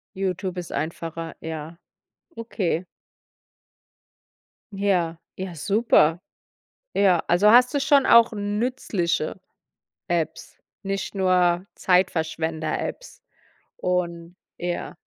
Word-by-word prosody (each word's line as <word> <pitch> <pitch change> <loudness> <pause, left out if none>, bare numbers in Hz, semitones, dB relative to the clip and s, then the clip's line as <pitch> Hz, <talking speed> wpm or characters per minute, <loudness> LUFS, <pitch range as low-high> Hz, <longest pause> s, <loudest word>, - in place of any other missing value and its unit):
Youtube 190 -1 -3
ist 175 - -6
einfacher, 165 +2 -4
ja. 160 +1 -7 0.6
Okay. 190 -6 -2 1.9
Ja, 180 -5 0 0.2
ja, 185 -1 -5
super. 180 -3 +3 0.7
Ja, 185 -4 +3
also 180 +5 +4
hast 250 +2 +6
du 290 - +1
schon 280 -1 +4
auch 235 0 +6
nützliche 205 -5 -2 0.7
Apps, 170 -3 -3 0.3
nicht 195 +1 -3
nur 180 -1 +2
Zeitverschwender-Apps 165 - -1 0.6
und 175 -1 -2 0.2
Ja. 175 0 -4
180 Hz, 85 wpm, -24 LUFS, 165-200 Hz, 1.9 s, hast